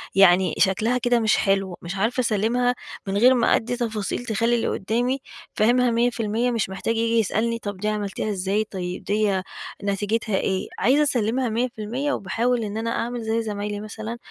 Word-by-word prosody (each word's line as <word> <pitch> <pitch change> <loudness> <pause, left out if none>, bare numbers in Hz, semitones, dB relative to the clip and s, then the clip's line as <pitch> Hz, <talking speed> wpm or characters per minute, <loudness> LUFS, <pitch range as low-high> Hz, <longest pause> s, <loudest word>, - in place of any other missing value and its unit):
يعني 185 -2 +5
شكلها 215 +6 +2
كده 245 0 +2
مش 220 -2 +3
حلو، 195 -2 0
مش 170 +2 -5
عارفة 225 +6 +1
أسلّمها 240 +3 +1 0.3
من 195 +1 -1
غير 250 +5 +6
ما 240 -2 +3
أدّي 245 +2 -2
تفاصيل 225 -1 -2
تخلّي 230 +1 +1
اللي 235 - 0
قدّامي 240 +6 -1 0.4
فاهمها 245 +3 +3
100%، 235 0 +1
مش 230 -5 -1
محتاج 195 +4 -2
ييجي 230 0 +2
يسألني، 230 +2 0
طب 205 -3 -5
دي 210 +3 -3
عملتيها 210 0 -2
إزاي؟ 200 +1 0
طيب 180 -4 -5
ديّة 205 -2 +1 0.4
نتيجتها 205 +2 -1
إيه؟ 190 0 -1
عايزة 265 +8 +4
أسلّمها 250 -2 0
100% 240 +4 -2
وباحاول 230 +5 0
إن 210 0 -4
أنا 225 +1 -2
أعمل 240 +1 -2
زي 220 +1 0
زمايلي 205 -1 -4
مثلًا، 220 +2 -6
220 Hz, 170 wpm, -23 LUFS, 200-240 Hz, 0.4 s, غير